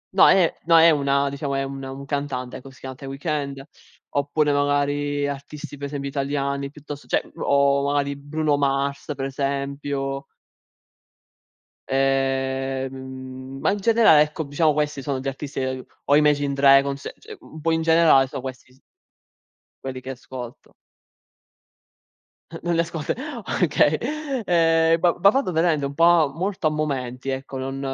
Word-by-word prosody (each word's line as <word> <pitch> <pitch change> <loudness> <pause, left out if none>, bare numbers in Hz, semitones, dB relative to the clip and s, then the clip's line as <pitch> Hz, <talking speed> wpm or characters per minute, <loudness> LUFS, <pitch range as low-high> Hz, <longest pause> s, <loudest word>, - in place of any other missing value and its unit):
No, - - +7
è 180 -4 +4
no, 165 0 +6
è 165 0 +7
una, 140 -1 +2
diciamo, 140 0 -3
è 135 - 0
un 135 0 -6
un 135 +1 -7
cantante, 140 -3 -3
ecco. 135 - -12
Si 130 -3 -18
chiama 130 0 -6
The 135 +1 -10
Weeknd. 140 -1 -3 0.5
Oppure, 145 +1 +1
magari, 145 0 0
artisti, 145 +1 -7
per 140 0 -5
esempio, 140 -1 -5
italiani, 140 0 -2
piuttosto, 145 0 -10
cioè, - - -1
o, 140 0 +2
magari, 140 0 0
Bruno 145 +1 -1
Mars, 140 0 0
per 135 0 -3
esempio 140 0 -3 1.6
Ehm, 135 0 -2
ma, - - +2
in 205 - -2
generale, 220 -7 +5
ecco, 150 +2 -1
diciamo, 150 +2 +2
questi 150 -1 -1
sono 135 0 -2
gli 135 - -6
artisti 135 +1 -5
che 130 -1 -3 0.2
o 145 - +4
Imagine 145 -1 +3
Dragons, 140 0 +4 0.2
cioè, 430 -1 -11
un 160 - -12
po', 165 +2 0
in 160 0 +1
generale, 160 -5 +5
sono 130 - -6
questi 130 -1 -8
s 130 - -25 1.0
quelli 130 -1 -5
che 130 +1 -7
ascolto. 125 -1 -10 1.9
Non 175 0 0
le 165 - +3
ascolt 165 -2 -5 0.5
okay. 155 -1 +3 0.5
Ehm, 165 -1 +3
va 175 +1 +4 0.2
vado, 270 -5 0
veramente, 160 -3 +1
un 140 - -4
po' 165 -3 +5
molto 185 -1 -1
a - - +3
momenti, 135 -4 -3
ecco. 135 0 -4
Non, 135 +1 -4
140 Hz, 150 wpm, -23 LUFS, 135-150 Hz, 1.9 s, No